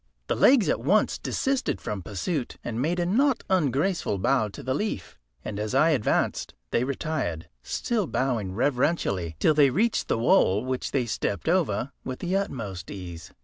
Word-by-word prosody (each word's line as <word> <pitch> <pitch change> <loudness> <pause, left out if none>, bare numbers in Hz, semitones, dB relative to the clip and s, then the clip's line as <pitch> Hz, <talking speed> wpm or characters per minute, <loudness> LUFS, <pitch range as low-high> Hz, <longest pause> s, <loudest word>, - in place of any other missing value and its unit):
The - - -1
legs 255 -6 +5
at - - +1
once - - +2
desisted 270 0 -1
from 105 -2 -4
pursuit, 120 - -3
and 120 0 -3
made 170 +6 0
a 175 - +1
not 255 +8 +2
ungraceful 155 - +1
bow 110 +3 +2
to 100 - -10
the 130 - -1
leaf, 130 - -3 0.3
and 105 -1 -4
as 110 +4 -2
I 155 +4 +5
advanced 130 -8 0 0.2
they 120 - +2
retired, 135 - -3
still 215 - -1
bowing 120 -10 -1
reverentially, 120 - 0
till 155 - +4
they 145 -2 +5
reached 215 - +1
the - - +1
wall, 110 -2 +3
which 130 0 -2
they 130 -3 0
stepped 105 0 -2
over 165 -6 +1
with 130 -1 -5
the 180 +2 -2
utmost 110 - -3
ease. 85 -4 -8
130 Hz, 170 wpm, -26 LUFS, 105-175 Hz, 0.3 s, legs